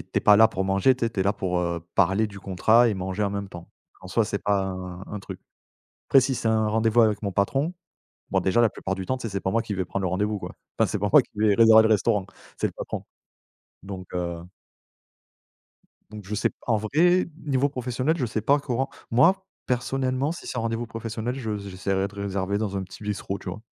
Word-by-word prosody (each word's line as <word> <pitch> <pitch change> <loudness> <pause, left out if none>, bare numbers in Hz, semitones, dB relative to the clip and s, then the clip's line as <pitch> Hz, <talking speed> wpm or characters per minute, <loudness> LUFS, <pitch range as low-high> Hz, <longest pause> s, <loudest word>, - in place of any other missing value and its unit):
es - - -6
tu - - -30
es - - -4
pas 105 - +6
là 110 +1 +7
pour 95 - -2
manger, 95 +7 +3
tu 120 -2 -1
sais. - - -3
Tu 105 - -3
es - - +4
là 100 +2 +2
pour, 90 -3 -2
heu, 85 -1 -2
parler 95 +3 +3
du 100 -1 -10
contrat 110 +6 +4
et 110 - 0
manger 95 +2 -3
en 100 - +1
même 100 0 -4
temps. 85 -2 -11 0.3
En 95 - -10
soi, 110 +4 +2
c'est 100 - -3
pas 100 -1 +1
un 90 -1 -6
un 105 - -6
truc. 95 - -9 0.7
Après, 135 - +7
si 130 +1 0
c'est 115 - -1
un 110 -1 +2
rendez-vous 110 +2 +3
avec 105 -2 +1
mon 100 -2 -2
patron 135 - 0 0.6
bon, - - +2
déjà, 95 +5 +2
la 115 - +5
plupart 95 -1 -4
du 95 -1 -6
temps, 130 - 0
tu - - -10
sais, 115 - -3
c'est 100 - -2
pas 95 - -1
moi 115 +3 +1
qui 110 -3 -4
vais 95 -1 -1
prendre 100 +2 -4
le 95 - 0
rendez-vous, 105 +4 -1
quoi. - - -7 0.3
Enfin, - - +4
c'est - - -2
pas - - +1
moi - - +8
qui - - -24
vais 105 -1 +3
réserver 110 -1 +8
le - - +4
restaurant, 105 -2 +2 0.3
c'est - - +1
le - - -11
patron, - - -5 0.8
donc 95 -1 -7
heu 85 -1 -3 1.7
donc 105 -1 -9
je 105 +3 -5
sais 105 - +1 0.2
en 115 - +3
vrai, 165 - +3 0.2
niveau 140 -1 +1
professionnel, 130 +3 -1
je 130 - -1
sais 110 0 -2
pas 140 +6 +3
comment. 135 -1 -2 0.2
Moi, 175 +11 +4 0.2
personnellement 130 +2 -1
si 170 - -7
c'est - - -5
un - - 0
rendez-vous 115 +1 -2
professionnel, 115 +1 -4
je 110 -5 -3
j'essaierai 95 0 -2
de 100 - -17
réserver 100 0 -2
dans 105 -2 -2
un 95 - -2
petit 95 - -13
bistrot, 105 -1 -3
tu - - -9
vois. - - -6
105 Hz, 245 wpm, -25 LUFS, 95-120 Hz, 1.7 s, moi